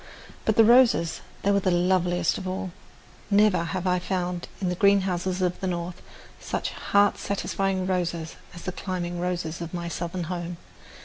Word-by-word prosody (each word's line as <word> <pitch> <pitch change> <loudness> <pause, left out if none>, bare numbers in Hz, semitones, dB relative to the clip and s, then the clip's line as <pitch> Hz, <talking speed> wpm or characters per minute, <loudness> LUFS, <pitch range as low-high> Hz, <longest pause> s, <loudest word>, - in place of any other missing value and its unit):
But 220 - +2
the 225 - +7
roses 235 -8 +5 0.2
they 200 - +3
were 200 - +4
loveliest 180 -1 +2
of 190 - -6
all. 185 0 -3 0.6
Never 200 -4 +4
have 180 +2 -3
I 180 -1 +2
found 180 -1 -2
in 185 - 0
the - - 0
greenhouses 190 -1 +2
of 180 -1 0
the 190 - -2
North 175 0 -4 0.4
such - - -3
heart 205 0 +2
satisfying 195 -1 -1
roses 175 -3 -2 0.2
as 175 - -9
the 185 - -2
climbing 175 -1 -4
roses 175 -2 -2
of 170 +1 -5
my 170 -1 -3
southern 175 +1 -3
home. 175 0 -4
180 Hz, 165 wpm, -26 LUFS, 175-190 Hz, 0.6 s, the